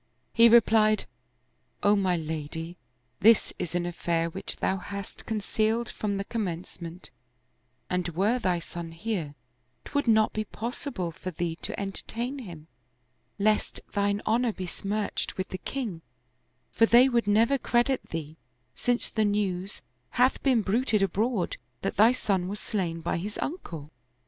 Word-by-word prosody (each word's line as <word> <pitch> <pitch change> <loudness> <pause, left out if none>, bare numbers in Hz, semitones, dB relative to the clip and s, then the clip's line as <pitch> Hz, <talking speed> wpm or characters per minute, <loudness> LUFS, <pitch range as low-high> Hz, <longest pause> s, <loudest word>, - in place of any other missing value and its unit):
" - - -45
He 235 0 +7
replied, 220 -2 +5 0.4
" - - -42
O 205 0 +5
my 190 -3 +2
lady, 160 +1 -5 0.4
this 225 +2 +5
is 175 0 -3
an 175 0 +1
affair 170 -1 -1
which 190 - -5
thou 190 - 0
hast 200 +1 -7
concealed 220 +1 0
from 200 -2 -2
the 195 - -1
commencement, 180 -4 -5 0.8
and 180 -1 -1
were 200 +9 +1
thy 185 -6 +1
son 170 0 -7
here, 170 -6 -3 0.5
'twould 285 -3 -1
not 220 -1 +4
be 215 - -1
possible 225 -4 -4
for 185 - -6
thee 170 -1 -2
to - - -4
entertain 235 +7 -3
him, 170 -10 -9 0.7
lest 210 +1 +1
thine 200 0 +1
honor 235 +2 +2
be 190 -3 -5
smirched 205 +4 -2
with 185 +1 -3
the 185 - -5
king; 225 -12 -4 0.7
for 225 - +4
they 245 +3 +7
would 235 -4 +1
never 230 +6 +4
credit 245 +2 +1
thee, 160 -1 -5 0.4
since 245 - 0
the 220 - 0
news 200 -2 -1 0.3
hath 250 +2 +4
been 255 -5 +3
bruited 215 0 +2
abroad 200 +1 0 0.3
that - - -2
thy 220 +4 +7
son 195 -7 0
was 205 +2 -4
slain 170 -6 -2
by - - -1
his 205 +5 -5
uncle." 165 - -5
205 Hz, 150 wpm, -28 LUFS, 175-230 Hz, 0.8 s, He